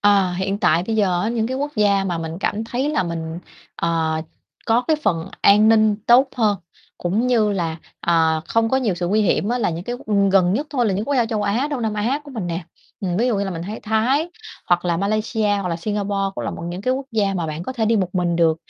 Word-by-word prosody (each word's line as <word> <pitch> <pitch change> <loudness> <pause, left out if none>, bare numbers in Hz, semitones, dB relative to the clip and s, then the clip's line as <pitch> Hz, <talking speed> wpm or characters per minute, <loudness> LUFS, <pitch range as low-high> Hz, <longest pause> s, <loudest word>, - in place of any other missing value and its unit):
Ờ, 200 -3 +4
hiện 195 +2 -1
tại 175 -4 +3
bây 225 -1 -1
giờ 185 -4 +2
á, 215 - 0
những 225 -1 0
cái 260 +1 -3
quốc 290 +2 -3
gia 200 -2 +3
mà 175 -3 -2
mình 165 +1 -5
cảm 215 +3 -1
thấy 255 +5 -2
là 305 - +1
mình, 165 -1 -4 0.4
ờ, 160 -1 0 0.5
có 230 +1 +3
cái 315 - +4
phần 165 -7 0
an 210 +2 +6
ninh 215 -2 +4
tốt 255 +3 +6
hơn, 210 -5 +2 0.4
cũng 205 +8 0
như 220 -4 +2
là, 165 -4 -2 0.2
ờ, 160 -2 +2
không 225 0 +2
có 265 - +2
nhiều 230 -8 0
sự 175 0 -2
nguy 215 +2 +2
hiểm 205 +1 +1
á, 245 +1 0
là 205 - +1
những 170 +3 -5
cái 245 0 -3
q 200 -4 +1
gần 185 -2 +4
nhất 285 +8 -1
thôi, 245 -5 +1
là 195 - +1
những 200 +3 -1
quốc 285 +3 -1
gia 240 -3 +2
châu 215 -2 -2
Á, 230 +8 0
Đông 260 -5 -2
Nam 220 -1 -1
Á 235 +8 0
của 285 - -11
mình 220 -8 -4
nè. 170 0 -3 0.4
Ừm, 180 -3 -1
ví 235 +5 +2
dụ 230 -5 +1
như 200 - 0
là 195 - -3
mình 165 -2 -5
thấy 210 +5 -6
Thái, 250 +10 +1 0.4
hoặc 175 0 +2
là 170 -1 +1
Malaysia, 215 +2 0
hoặc 190 -2 -2
là 165 - -1
Singapore 200 +1 -2
cũng - - -4
là - - -2
một - - -7
những 180 +2 -5
cái 255 +3 +1
quốc 270 0 -5
gia 200 -3 +1
mà 170 -3 -2
bạn 155 +2 -5
có 260 - -5
thể 230 -3 -1
đi 225 +1 +3
một 185 -2 -1
mình 175 -2 +1
được. 165 -2 +3
205 Hz, 265 wpm, -21 LUFS, 175-225 Hz, 0.5 s, an